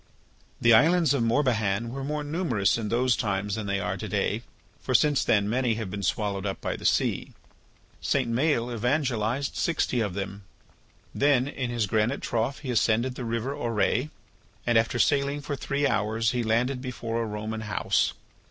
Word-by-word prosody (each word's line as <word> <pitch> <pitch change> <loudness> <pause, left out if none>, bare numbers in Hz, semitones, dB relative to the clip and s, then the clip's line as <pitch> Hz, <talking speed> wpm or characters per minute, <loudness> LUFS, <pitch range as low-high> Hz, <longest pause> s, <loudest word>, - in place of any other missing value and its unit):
The 120 0 +5
islands 160 +4 +5
of 140 - +1
Morbihan 115 -3 +1
were 135 +2 -5
more 150 +2 -2
numerous 145 - +1
in 110 -2 -3
those 120 +1 +2
times 100 -1 -1
than 110 -1 -3
they 100 0 0
are - - -2
to - - -5
day. - - 0 0.4
For - - -2
since 150 -2 +4
then 100 -2 +2
many 120 +1 +1
have 110 -4 -5
been 105 - -4
swallowed 100 -1 -1
up 100 -2 -3
by - - -3
the - - -1
sea. - - 0 0.7
St. 135 -4 +1
Maël 125 -2 +1
evangelized 125 0 0
sixty 155 -6 0
of 100 -4 -2
them. 100 0 -5 0.7
Then 140 -2 +3
in 130 -3 -3
his 120 -3 0
granite 110 +6 0
trough 120 +4 -1
he 135 -4 -3
ascended 115 +2 +2
the 125 -1 -6
river 115 +3 -2
Auray. 120 +2 0 0.6
And 120 - +2
after 115 +3 +2
sailing 140 +3 +2
for 145 0 -4
three 140 +1 -1
hours 110 -1 +1
he 125 - -1
landed 120 +4 0
before 115 -3 -3
a - - -1
Roman 110 +1 -4
house. 105 -3 0
120 Hz, 175 wpm, -27 LUFS, 110-135 Hz, 0.7 s, The